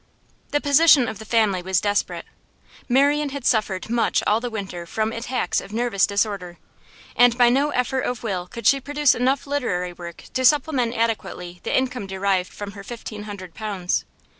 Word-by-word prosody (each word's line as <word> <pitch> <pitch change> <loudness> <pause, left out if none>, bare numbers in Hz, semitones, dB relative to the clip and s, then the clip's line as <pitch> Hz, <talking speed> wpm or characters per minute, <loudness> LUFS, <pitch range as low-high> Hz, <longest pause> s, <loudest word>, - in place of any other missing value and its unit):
The 290 - +1
position 285 -2 +5
of 220 -2 -5
the 220 - -9
family 215 -4 +2
was 185 0 +1
desperate. 205 0 -1 0.6
Marian 285 +3 +3
had 275 -2 -6
suffered 210 -5 +1
much 235 +1 +1
all 215 +2 +3
the 245 +1 -4
winter 190 -6 -6
from 220 +4 -1
attacks 245 +2 -1
of - - -12
nervous 225 -3 +1
disorder, 200 -4 -2 0.6
and 245 -1 +5
by 245 -1 +6
no 275 +4 +2
effort 260 -1 0
of 245 -2 -3
will 185 -5 -3
could 235 +2 -9
she 275 +4 +5
produce 290 0 +2
enough 260 +2 0
literary 180 -11 -2
work 170 -1 -10
to 260 - -1
supplement 260 -3 +3
adequately 180 -6 -2
the - - 0
income 250 -5 -1
derived 190 -1 0
from 205 -1 -7
her 200 -1 -10
fifteen 215 -1 -8
hundred 195 -4 -8
pounds. 200 -5 -2
225 Hz, 175 wpm, -23 LUFS, 195-255 Hz, 0.6 s, by